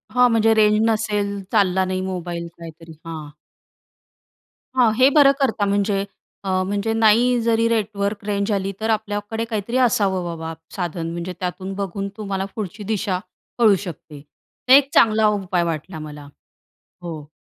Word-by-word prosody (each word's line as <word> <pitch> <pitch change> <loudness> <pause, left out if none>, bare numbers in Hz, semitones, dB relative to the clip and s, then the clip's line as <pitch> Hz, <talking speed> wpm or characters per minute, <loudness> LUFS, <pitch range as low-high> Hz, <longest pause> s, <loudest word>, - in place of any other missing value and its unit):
हां. 250 0 +5
म्हणजे 225 0 +4
रेंज 210 0 +5
नसेल. 210 -2 0 0.2
चालला 190 -3 +2
नाही 185 0 -2
मोबाईल. 175 -2 -4
काहीतरी 165 0 -11
हां. 155 -3 -7 1.5
हां, 240 -4 +4
हे 260 +3 +6
बरं 280 -1 +6
करता. 225 -6 +1
म्हणजे 200 0 0 0.4
अ, 195 - -4
म्हणजे, 205 +3 -1
नाही 230 +3 +4
जरी 230 0 +2
नेटवर्क 205 -2 -1
रेंज 200 0 -1
आली, 195 -1 -1
तर 220 - -1
आपल्याकडे 215 +1 -2
काहीतरी 230 +2 -2
असावं 195 -5 +1
बाबा 165 -1 -5 0.2
साधन. 170 -3 -3
म्हणजे 170 +2 -5
त्यातून 185 +1 -4
बघून 200 0 -3
तुम्हाला 195 -2 -3
पुढची 210 -1 -5
दिशा 200 -3 -1 0.4
कळू 215 -4 +6
शकते. 150 -3 -9 0.5
तर 260 - +7
एक 280 0 +7
चांगला 215 -1 +5
उपाय 190 -4 0
वाटला 165 0 -4
मला. 150 -1 -9 0.8
हो. 155 -4 -7
200 Hz, 145 wpm, -21 LUFS, 180-220 Hz, 1.5 s, तर